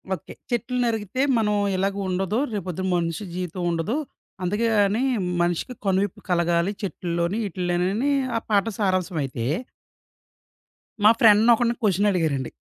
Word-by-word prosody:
Okay. 155 Hz, -, -12 dB, 0.2 s
చెట్లు 240 Hz, +1 st, -1 dB
నరికితే 225 Hz, +2 st, -1 dB, 0.2 s
మనం 210 Hz, -2 st, +1 dB, 0.2 s
ఇలాగ 195 Hz, +1 st, 0 dB
ఉండదు 190 Hz, +4 st, -1 dB, 0.2 s
రేపు 200 Hz, -3 st, -3 dB
పొద్దున 185 Hz, +2 st, -3 dB
మనిషి 170 Hz, +3 st, -2 dB
జీవితం 180 Hz, 0 st, -4 dB
ఉండదు. 170 Hz, -, -1 dB, 0.5 s
అందుకే 205 Hz, +6 st, 0 dB
గాని 205 Hz, +5 st, +2 dB, 0.4 s
మనిషికి 175 Hz, +8 st, -1 dB
కనువిప్పు 195 Hz, 0 st, 0 dB
కలగాలి 170 Hz, +1 st, +2 dB
చెట్లల్లోని 175 Hz, 0 st, -2 dB
ఈటిల్లోని 180 Hz, 0 st, -1 dB
అని 280 Hz, +5 st, +1 dB, 0.3 s
ఆ -, -, +1 dB
పాట 205 Hz, 0 st, +3 dB
సారాంశమైతే... 170 Hz, -, -1 dB, 1.6 s
మా 215 Hz, -, +8 dB
ఫ్రెండ్‌ని 225 Hz, +1 st, +6 dB
ఒకడిని 235 Hz, +1 st, +1 dB
క్వెషన్ 205 Hz, -1 st, +2 dB
అడిగారండి. 150 Hz, -8 st, -1 dB
190 Hz, 130 wpm, -24 LUFS, 175-210 Hz, 1.6 s, మా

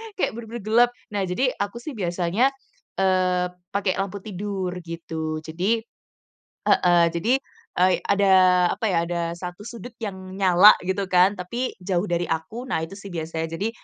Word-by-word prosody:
kayak -, -, 0 dB
bener-bener 235 Hz, 0 st, -7 dB
gelap. 235 Hz, +3 st, +4 dB, 0.2 s
Nah 205 Hz, -1 st, -1 dB
jadi 250 Hz, +9 st, +1 dB
aku 205 Hz, +4 st, -3 dB
sih 280 Hz, -1 st, -7 dB
biasanya, 180 Hz, +7 st, +1 dB, 0.5 s
eee, 185 Hz, -1 st, +2 dB, 0.3 s
pakai 200 Hz, -2 st, 0 dB
lampu 195 Hz, +1 st, -3 dB
tidur 195 Hz, -2 st, -4 dB, 0.2 s
gitu, 160 Hz, -2 st, -4 dB
jadi 185 Hz, +9 st, -1 dB, 0.9 s
heeh, 175 Hz, -1 st, +5 dB
jadi 170 Hz, +9 st, 0 dB, 0.5 s
ei 185 Hz, 0 st, +5 dB
ada, 200 Hz, 0 st, +2 dB, 0.5 s
apa -, -, -6 dB
ya, 170 Hz, -, +2 dB
ada 175 Hz, -1 st, -1 dB
1 180 Hz, +3 st, -7 dB
sudut 235 Hz, 0 st, -9 dB
yang 190 Hz, -2 st, -6 dB
nyala 190 Hz, +1 st, +7 dB
gitu 190 Hz, +1 st, -1 dB
kan 180 Hz, +2 st, +5 dB
tapi 240 Hz, +8 st, -3 dB
jauh 180 Hz, -1 st, -1 dB
dari 175 Hz, -2 st, -1 dB
aku, 165 Hz, +11 st, -3 dB
nah -, -, 0 dB
itu 175 Hz, -, -10 dB
sih 200 Hz, -, -9 dB
biasanya. 165 Hz, -1 st, -3 dB
Jadi 215 Hz, +3 st, -1 dB
185 Hz, 155 wpm, -24 LUFS, 175-210 Hz, 0.9 s, nyala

